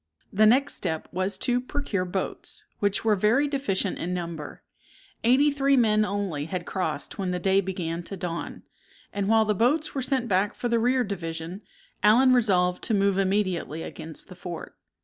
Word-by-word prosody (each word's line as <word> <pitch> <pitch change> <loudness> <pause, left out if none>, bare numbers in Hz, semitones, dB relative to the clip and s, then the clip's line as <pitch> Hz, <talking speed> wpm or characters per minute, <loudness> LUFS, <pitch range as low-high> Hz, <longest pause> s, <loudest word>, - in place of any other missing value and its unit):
The 215 +2 +5
next 275 +5 +4
step 160 -4 -3
was 185 +2 -1
to 245 0 +1
procure 255 -8 -2
boats, 185 +1 -4
which 200 +1 0
were 215 -2 +4
very 225 +9 +3
deficient 210 -9 -1
in 180 +2 -2
number. 170 -4 -6 0.6
Eighty 265 +5 +5
three 275 -1 +2
men 215 -3 +4
only 200 -8 -2
had 175 +1 -4
crossed 190 +1 -3
when 190 -2 -1
the 180 - -1
day 190 +2 +3
began 175 -3 -3
to 195 - -7
dawn; 175 -1 -5 0.5
and 200 -1 -1
while 220 0 +5
the 210 - +2
boats 275 - +1
were 270 - -2
sent 255 -1 0
back 200 0 +1
for 245 - -2
the 235 -1 +2
rear 250 +2 +2
division, 170 -2 -5 0.4
Allen 250 +5 +6
resolved 180 -7 +2
to 220 - +1
move 200 -1 +2
immediately 185 -5 0
against 160 -1 -9
the 185 - -11
fort. 175 -1 -7
200 Hz, 175 wpm, -26 LUFS, 180-240 Hz, 0.6 s, Allen